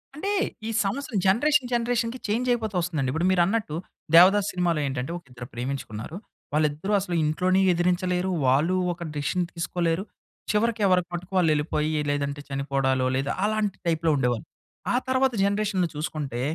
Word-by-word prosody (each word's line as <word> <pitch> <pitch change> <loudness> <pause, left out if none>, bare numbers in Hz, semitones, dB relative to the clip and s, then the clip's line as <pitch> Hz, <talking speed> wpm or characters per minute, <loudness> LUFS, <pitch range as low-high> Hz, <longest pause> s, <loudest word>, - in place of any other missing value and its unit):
అంటే, 390 +7 -2 0.4
ఈ - - -2 0.2
సమస్యలు 235 +2 -2
జనరేషన్ 260 +7 +3
జనరేషన్‌కి 240 0 0
చేంజయిపోతూ 225 -1 0
వస్తుందండి. 160 -6 -1
ఇప్పుడు 160 +5 0
మీరన్నట్టు 185 -1 +1 0.4
'దేవదాసు' 195 +4 +7
సినిమాలో 175 -3 +1
ఏంటంటే, 130 +2 -3
ఒకిద్దరు 125 -6 -11
ప్రేమించుకున్నారు. 125 - -5 0.4
వాళ్ళిద్దరూ 155 +6 0
అసలు 180 -2 -3
ఇంట్లోనీ 185 +5 +2
ఎదిరించలేరు, 180 +1 0 0.2
వాళ్ళు 150 +8 +3 0.2
ఒక 170 0 -8
డెసిషన్ 150 +5 0
తీసుకోలేరు, 170 +1 -1 0.5
చివరికి 220 +1 +1
ఎవరికి 180 -2 +3
మట్టుకు 175 +2 -6
వాళ్ళేళ్ళిపోయి, 155 -2 +1 0.2
లేదంటే 145 0 -2
చనిపోవడాలు, 135 -1 0
లేదా 135 +2 -1
అలాంటి 210 -2 0
టైప్‌లో 165 -1 +2
ఉండేవాళ్ళు. 125 -3 0 0.5
ఆ - - +2
తర్వాత 260 0 +2
జనరేషన్‌లో 200 -3 +1
చూసుకుంటే, 150 -5 -3
175 Hz, 130 wpm, -25 LUFS, 145-205 Hz, 0.5 s, దేవదాసు